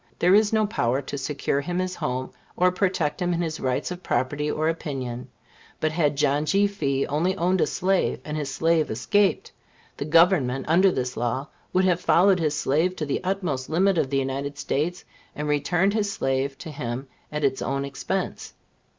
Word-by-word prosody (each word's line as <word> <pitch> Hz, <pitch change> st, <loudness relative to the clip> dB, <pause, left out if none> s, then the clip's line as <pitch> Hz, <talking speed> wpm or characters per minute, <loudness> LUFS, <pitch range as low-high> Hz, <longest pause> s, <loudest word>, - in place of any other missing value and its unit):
There 180 Hz, +2 st, +4 dB
is 210 Hz, +1 st, +5 dB
no 220 Hz, -1 st, +3 dB
power 135 Hz, -, 0 dB
to -, -, -6 dB
secure 140 Hz, 0 st, -1 dB
him 175 Hz, +5 st, -3 dB
his 185 Hz, 0 st, -1 dB
home, 130 Hz, +1 st, -3 dB, 0.3 s
or 180 Hz, 0 st, +4 dB
protect 185 Hz, -3 st, 0 dB
him 175 Hz, -1 st, +1 dB
in 170 Hz, -, -1 dB
his 160 Hz, -1 st, -3 dB
rights 130 Hz, +6 st, -1 dB
of 180 Hz, 0 st, -6 dB
property 145 Hz, +1 st, -1 dB
or 155 Hz, +1 st, 0 dB
opinion. 130 Hz, -6 st, -3 dB, 0.5 s
But 155 Hz, -, +1 dB
had 150 Hz, -3 st, +1 dB
John 145 Hz, +1 st, +1 dB
G. 200 Hz, +5 st, +3 dB
Fee 140 Hz, -9 st, 0 dB
only 170 Hz, +7 st, 0 dB
owned 180 Hz, 0 st, +1 dB
a -, -, +3 dB
slave, 190 Hz, +1 st, 0 dB
and 150 Hz, -, -4 dB
his 145 Hz, -3 st, -3 dB
slave 160 Hz, +2 st, +2 dB
escaped, 195 Hz, -, +1 dB, 0.5 s
the -, -, -3 dB
Government, 155 Hz, -5 st, +3 dB
under 180 Hz, +5 st, +5 dB
this 125 Hz, -5 st, -2 dB
law, 120 Hz, +5 st, -2 dB, 0.2 s
would 185 Hz, +1 st, +2 dB
have 180 Hz, -1 st, +2 dB
followed 190 Hz, +1 st, +4 dB
his 155 Hz, -2 st, 0 dB
slave 160 Hz, +7 st, +1 dB
to 155 Hz, -, -3 dB
the 145 Hz, -, -2 dB
utmost 180 Hz, -9 st, -2 dB
limit 185 Hz, +2 st, +2 dB
of 135 Hz, -, 0 dB
the 140 Hz, -, 0 dB
United 135 Hz, +1 st, -2 dB
States, 175 Hz, +6 st, -2 dB, 0.3 s
and 150 Hz, 0 st, -3 dB
returned 165 Hz, +7 st, +1 dB
his 210 Hz, -2 st, 0 dB
slave 135 Hz, -3 st, -1 dB
to 160 Hz, -, -8 dB
him 130 Hz, -1 st, -5 dB, 0.2 s
at 150 Hz, 0 st, -3 dB
its 135 Hz, -1 st, +1 dB
own 140 Hz, +1 st, -1 dB
expense. 175 Hz, +7 st, -4 dB
155 Hz, 190 wpm, -25 LUFS, 135-180 Hz, 0.5 s, is